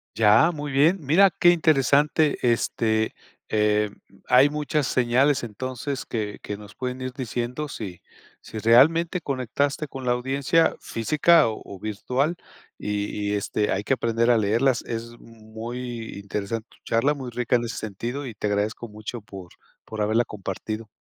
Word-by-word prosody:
Ya, 110 +8 +5
muy 145 -3 -5
bien, 155 +8 +4
mira 190 +8 +6
qué 175 0 +4
interesante, 150 -2 +3
este, 110 -2 +1 0.4
eh, 105 -1 +2 0.4
hay 130 +3 +6
muchas 150 -1 -1
señales 130 +3 +2
entonces 130 +4 -5
que 105 -3 -4
que 105 - -5
nos 105 0 -13
pueden 125 0 -5
ir 130 0 -4
diciendo 125 +3 -3
si 100 -10 -7 0.4
si 110 - -9
realmente 160 - +4
conectaste 140 +3 -1
con 135 -1 -8
la 120 - +4
audiencia 135 +6 +1
física 155 +6 +3
o 110 - -4
o 100 - -10
virtual 125 - -1 0.4
y 105 0 -2
y, 105 - 0
este, 105 +1 -1
hay 105 - -1
que 135 - +1
aprender 115 -1 +1
a 120 - +4
leerlas. 115 +5 +2
Es 115 +1 -6
muy 115 +1 -7
interesante 105 +3 -4 0.2
charla, 125 +6 +2
muy 135 -4 -6
rica 125 +1 0
en 120 - -3
ese 115 - -5
sentido 120 +7 -5
y 120 - -6
te 105 - -3
agradezco 105 +3 -1
mucho 110 +2 -7
por 95 -4 -11 0.4
por 110 -1 -5
haberla 110 +3 +2
compartido. 110 +2 -6
120 Hz, 155 wpm, -24 LUFS, 110-140 Hz, 0.4 s, mira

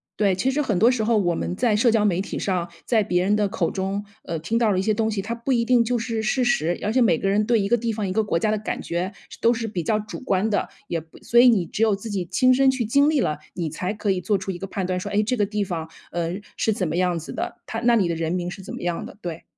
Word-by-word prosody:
对， 200 -3 +2
其 260 +8 +1
实 295 +3 0
很 215 -10 0
多 230 +6 +5
时 230 -4 0
候 225 0 +2
我 175 -4 +2
们 175 - -3
在 230 -1 +2
社 230 +3 +4
交 220 -2 +3
媒 185 -2 +2
体 - - -5
上， 180 -3 -1 0.2
在 225 -3 +3
别 180 -2 +1
人 205 +2 +2
的 205 -2 +1
口 170 -4 -1
中， 195 +2 -3 0.2
呃， 165 -1 -3
听 200 +9 -1
到 220 -3 +3
了 185 - +1
一 - - +2
些 215 +2 +1
东 220 +1 0
西， 200 -3 -2
它 230 +3 -3
不 235 +3 -3
一 235 -2 +2
定 245 -1 +4
就 245 +1 0
是 230 -1 -2
事 250 +4 +1
实， 175 -8 +1
而 210 +2 0
且 255 - +3
每 175 -9 +4
个 195 - -2
人 205 +2 +2
对 235 -2 +3
一 200 - 0
个 240 - +4
地 230 0 -1
方、 210 -2 -2
一 185 - -2
个 220 - +2
国 185 -5 0
家 215 +5 +1
的 215 - +1
感 215 - -3
觉， 175 +4 -3 0.3
都 230 - +5
是 230 -1 -2
比 185 -5 -3
较 215 +6 +1
主 210 0 -7
观 205 -5 0
的， 205 - 0 0.2
也 165 -2 -2
不 160 - -18
所 235 - +4
以 250 0 +8
你 195 -7 +3
只 215 - -5
有 215 -3 +4
自 210 +2 -7
己 185 -3 -2
亲 255 +9 +3
身 270 +1 +4
去 260 -4 0
经 280 +6 +4
历 295 -5 +2
了， 150 -1 -1 0.2
你 165 -4 -3
才 180 +4 -3
可 205 -1 -1
以 185 -1 -1
做 200 +3 +1
出 190 0 -4
一 175 - -7
个 195 - -5
判 190 -1 -3
断， 180 0 -1
说 - - -5
哎 210 +1 +2
这 250 +4 0
个 205 -3 +1
地 210 -1 -1
方， 165 -4 -4 0.2
呃， 175 +3 -2 0.2
是 220 - +1
怎 185 -4 -1
么 160 - -2
样 180 -2 +1
子 160 - -7
的？ - - -4
它 225 - -4
那 240 0 +4
里 195 -6 +3
的 170 - -1
人 165 0 -2
民 175 -1 -2
是 195 - -8
怎 190 - -7
么 - - -7
样 175 -1 -2
的？ - - -13
对。 170 -3 -6
205 Hz, 340 characters per minute, -23 LUFS, 180-230 Hz, 0.3 s, 以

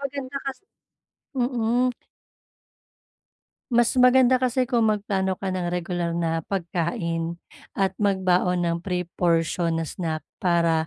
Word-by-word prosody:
maganda 275 -1 -5
kasi 270 +6 -5 0.7
mm. 245 -1 +1 1.8
Mas 240 0 +4
maganda 255 0 +6
kasi 255 0 +1
kung 240 -3 +2
magplano 200 -3 0
ka 190 +1 -4
ng 185 -1 -2
regular 175 -1 -2
na 165 -1 0
pagkain 170 -2 -2 0.4
at 195 -1 +1
magbaon 185 -3 +2
ng 170 -1 +1
pre-portion 170 -2 0
na 165 - 0
snack 160 -1 -4 0.2
para 170 -2 +2
185 Hz, 110 wpm, -24 LUFS, 170-240 Hz, 1.8 s, maganda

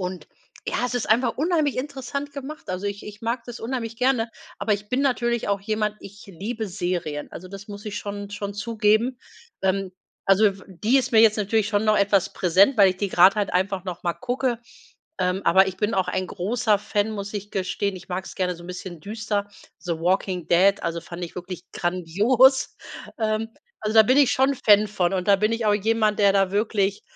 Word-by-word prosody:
Und 180 -3 -5 0.4
ja, 245 - 0
es 250 - -5
ist 245 - -2
einfach 235 +1 +2
unheimlich 310 -2 +1
interessant 280 +1 -4
gemacht. 280 -1 -8
Also 185 +2 -3
ich 200 0 -5
ich 210 0 -10
mag 230 +1 -2
das 240 -1 -9
unheimlich 230 -1 -4
gerne, 250 -3 +1 0.3
aber 215 - 0
ich 205 +1 -3
bin 250 +4 0
natürlich 240 -3 0
auch 200 -1 0
jemand, 210 +1 -1
ich 200 +2 -12
liebe 215 +5 -5
Serien. 175 -5 -3
Also 185 - -9
das 195 +2 -10
muss 205 0 -9
ich 210 -1 -4
schon 205 0 -6
schon 205 0 -5
zugeben. 220 +3 +1 0.4
Ähm, 190 0 0 0.3
also 195 +2 +5
f 195 -1 -2
die 210 +7 +1
ist 265 - 0
mir 220 - +7
jetzt 220 -1 +5
natürlich 210 0 +1
schon 205 0 +1
noch 215 -1 +3
etwas 200 -1 +2
präsent, 195 +8 +3
weil 200 -2 +8
ich 185 - -6
die 200 +1 -2
gerade 185 +2 +6
halt 205 -2 -1
einfach 190 0 0
noch 180 -3 -6
mal 170 -1 -1
gucke. 245 - -2 0.6
Ähm, 180 +1 0
aber 190 +2 +5
ich 185 - -6
bin 210 +2 -1
auch 190 -1 0
ein 185 0 -1
großer 210 +3 0
Fan, 205 +1 -1
muss 205 -1 -6
ich 205 0 -5
gestehen. 195 +1 -2
Ich 185 - -13
mag's 185 +1 -5
gerne 180 -2 -1
so 170 - -13
'n - - -11
bisschen 180 -2 -7
düster, 210 +1 -3 0.3
The 175 - -3
Walking 180 -1 0
Dead, 195 +3 +4
also 170 0 -2
fand 170 +1 -9
ich 170 - -10
wirklich 180 0 -7
grandios. 205 +10 +2 0.4
Ähm, 220 0 -1 0.3
also 215 0 -2
da 220 - +9
bin 255 +5 +3
ich 280 -3 +5
schon 265 +2 +2
Fan 210 -4 +4
von 185 -3 0
und 185 +1 -2
da 200 - +6
bin 215 +3 +1
ich 230 -1 -1
auch 210 - +4
jemand, 215 0 +1
der 200 -1 +5
da 195 -1 +2
wirklich 205 -1 0
205 Hz, 210 wpm, -24 LUFS, 190-225 Hz, 0.6 s, da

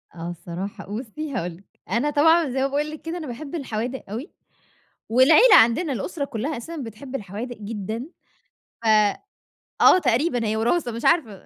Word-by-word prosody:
آه 170 +1 -6
الصراحة 175 +3 -7
بُصّي 260 +7 -5
هاقول 175 -8 -3
لِك، 195 - -21 0.3
أنا 245 +6 +1
طبعًا 320 +2 +4
زي 265 +1 -1
ما 270 - +2
باقول 295 +2 -2
لِك 310 - -9
كده 330 +2 -5
أنا 315 - -6
باحب 275 +6 -7
الحوادق 255 -3 -4
أوي، 240 - -6 0.8
والعيلة 305 - +6
عندنا 270 +7 +4
الأسرة 285 +4 -3
كلّها 275 +2 -4
أساسًا 325 +8 -7
بتحب 255 +1 -8
الحوادق 220 +3 -6
جدًا، 215 +3 -5 0.8
ف - - -1 1.0
آه - - +8
تقريبًا 245 -1 +1
هي 215 - 0
وراثة 240 +4 +1
مش 230 +1 -6
عارفة، 230 - +1
250 Hz, 160 wpm, -23 LUFS, 220-300 Hz, 1.0 s, آه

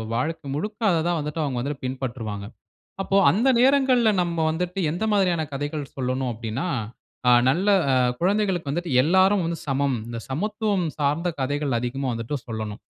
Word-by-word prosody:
வாழ்க்கை 155 +3 -2
முழுக்க, 210 +7 -4
அத 165 -2 +2
தான் 175 -1 +1
வந்துட்டு 150 +2 -3
அவங்க 135 -4 -2
வந்துட்டு 140 +1 -4
பின்பற்றுவாங்க. 120 -6 -4 0.6
அப்போ 195 - 0
அந்த 230 +9 +2
நேரங்கள்ல 260 -4 +4
நம்ப 170 -1 -2
வந்துட்டு, 180 +3 -3
"எந்த 180 +7 -2
மாதிரியான 180 -5 +2
கதைகள் 145 +1 -3
சொல்லணும்?" 130 -1 -1
அப்படீன்னா, 115 +9 -4 0.6
ஆ - - +7 0.2
நல்ல 185 +8 0 0.5
குழந்தைகளுக்கு 185 -5 +1
வந்துட்டு 175 +2 -3
எல்லாரும் 190 +4 +4
வந்து 165 -1 -3
சமம். 135 -1 +1
இந்த 115 -1 -5
சமத்துவம் 200 - -1
சார்ந்த 150 +5 0
கதைகள் 140 -2 0
அதிகமா 130 +2 -3
வந்துட்டு 115 +6 -3
சொல்லணும். 110 -2 -5
155 Hz, 150 wpm, -24 LUFS, 130-185 Hz, 0.6 s, ஆ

